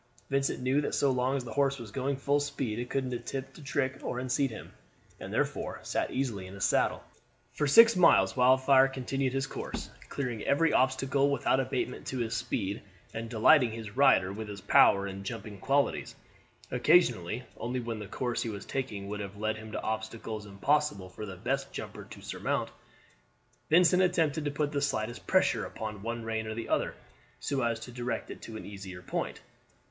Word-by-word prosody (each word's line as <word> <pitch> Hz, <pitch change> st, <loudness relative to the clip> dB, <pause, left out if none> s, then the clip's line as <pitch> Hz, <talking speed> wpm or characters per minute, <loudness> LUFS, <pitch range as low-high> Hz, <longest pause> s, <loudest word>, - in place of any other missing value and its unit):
Vincent 135 Hz, 0 st, +1 dB
knew 135 Hz, +3 st, +2 dB
that -, -, -2 dB
so 140 Hz, -, +3 dB
long 130 Hz, +2 st, +1 dB
as 130 Hz, -, -3 dB
the 115 Hz, -2 st, -7 dB
horse 140 Hz, -1 st, +2 dB
was 115 Hz, -5 st, -9 dB
going 135 Hz, +2 st, -1 dB
full 140 Hz, +2 st, +2 dB
speed 130 Hz, -6 st, -3 dB
it 120 Hz, 0 st, -4 dB
could 130 Hz, -2 st, -1 dB
attempt 130 Hz, +3 st, -5 dB
no 155 Hz, -, -12 dB
trick 130 Hz, -1 st, -1 dB
to -, -, -4 dB
unseat 130 Hz, +2 st, 0 dB
him, 110 Hz, -, -9 dB, 0.5 s
and -, -, -7 dB
he -, -, -9 dB
therefore -, -, -1 dB
sat -, -, -1 dB
easily 115 Hz, -9 st, -2 dB
in 95 Hz, -, -10 dB
his 100 Hz, -, 0 dB
saddle. -, -, +1 dB, 0.5 s
For 150 Hz, -, 0 dB
six 230 Hz, +10 st, +8 dB
miles 95 Hz, -, +5 dB
Wildfire 130 Hz, +1 st, +5 dB
continued 135 Hz, 0 st, -2 dB
his 135 Hz, 0 st, 0 dB
course, -, -, -6 dB, 0.2 s
clearing 125 Hz, -6 st, -3 dB
every 155 Hz, +3 st, +3 dB
obstacle 135 Hz, +2 st, +2 dB
without 135 Hz, -1 st, +2 dB
abatement 130 Hz, -1 st, -2 dB
to 130 Hz, -, -3 dB
his 115 Hz, -1 st, -1 dB
speed, 100 Hz, -1 st, -2 dB, 0.3 s
and 115 Hz, 0 st, -5 dB
delighting 115 Hz, +1 st, +5 dB
his 110 Hz, -2 st, -7 dB
rider 130 Hz, -9 st, +4 dB
with 110 Hz, +1 st, -6 dB
his 105 Hz, -1 st, -7 dB
power 100 Hz, 0 st, +5 dB
and 100 Hz, 0 st, -6 dB
jumping 105 Hz, -1 st, -6 dB
qualities. 140 Hz, +6 st, 0 dB, 0.6 s
Occasionally, 125 Hz, -, +3 dB
only 125 Hz, +3 st, -2 dB
when 115 Hz, -2 st, -4 dB
the 105 Hz, -, -6 dB
course 120 Hz, +1 st, -2 dB
he 115 Hz, -, -2 dB
was 100 Hz, -2 st, -6 dB
taking 105 Hz, -7 st, -4 dB
would 105 Hz, +1 st, -4 dB
have 100 Hz, 0 st, -6 dB
led 110 Hz, +1 st, -1 dB
him 110 Hz, 0 st, -9 dB
to -, -, -3 dB
obstacles 110 Hz, -1 st, -4 dB
impossible 100 Hz, -1 st, 0 dB
for 105 Hz, +3 st, -7 dB
the 95 Hz, -, -7 dB
best 135 Hz, +8 st, -2 dB
jumper -, -, -7 dB
to -, -, -12 dB
surmount, -, -, -2 dB, 1.0 s
Vincent 180 Hz, +3 st, +5 dB
attempted 160 Hz, -5 st, +2 dB
to -, -, +1 dB
put 145 Hz, 0 st, -1 dB
the 140 Hz, -1 st, -1 dB
slightest 120 Hz, -4 st, -2 dB
pressure -, -, +3 dB
upon 110 Hz, -2 st, -6 dB
one 115 Hz, +2 st, -4 dB
rein 110 Hz, -1 st, -2 dB
or 110 Hz, -, -4 dB
the 115 Hz, 0 st, -5 dB
other, -, -, 0 dB, 0.4 s
so 140 Hz, -2 st, -1 dB
as 115 Hz, -2 st, 0 dB
to 125 Hz, -, -8 dB
direct 125 Hz, 0 st, -3 dB
it -, -, -9 dB
to 110 Hz, -, -7 dB
an -, -, -8 dB
easier 95 Hz, -3 st, -8 dB
point. -, -, -3 dB
125 Hz, 195 wpm, -30 LUFS, 110-135 Hz, 1.0 s, six